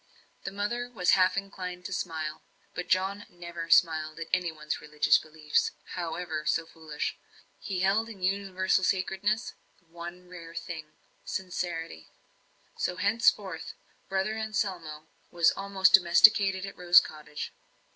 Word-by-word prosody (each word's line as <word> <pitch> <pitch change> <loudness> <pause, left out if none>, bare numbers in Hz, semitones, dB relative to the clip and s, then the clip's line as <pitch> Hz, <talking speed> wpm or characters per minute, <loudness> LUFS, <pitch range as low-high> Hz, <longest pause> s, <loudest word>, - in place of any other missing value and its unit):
The - - -3
mother 225 +5 -2
was 185 -7 +1
half 185 0 +4
inclined 185 -2 -5
to 195 - -4
smile; 160 -4 -3 0.3
but 180 - -5
John 195 +2 0
never 170 -1 -7
smiled 160 -2 +3
at 165 - -6
any 180 -2 +1
one's 155 -1 -5
religious 150 0 +3
beliefs, 155 -1 0 0.2
howsoever 170 -2 -3
foolish. 160 -2 -3 0.4
He 185 -3 -3
held 205 +4 +2
in 195 -5 -10
universal 190 -1 +1
sacredness 195 +3 0 0.3
that 170 - -35
one 175 +2 -9
rare 170 -2 -11
thing 155 -3 -7 0.3
sincerity. 170 - -4 0.7
So 180 - -1
henceforward 200 -2 +2 0.5
"Brother 190 +2 0
Anselmo" 190 -8 -3 0.2
was 170 -2 +4
almost 195 -1 +2
domesticated 190 +1 +6
at 195 - -8
Rose 175 0 +7
Cottage. 150 -1 -7
180 Hz, 125 wpm, -29 LUFS, 165-195 Hz, 0.7 s, Rose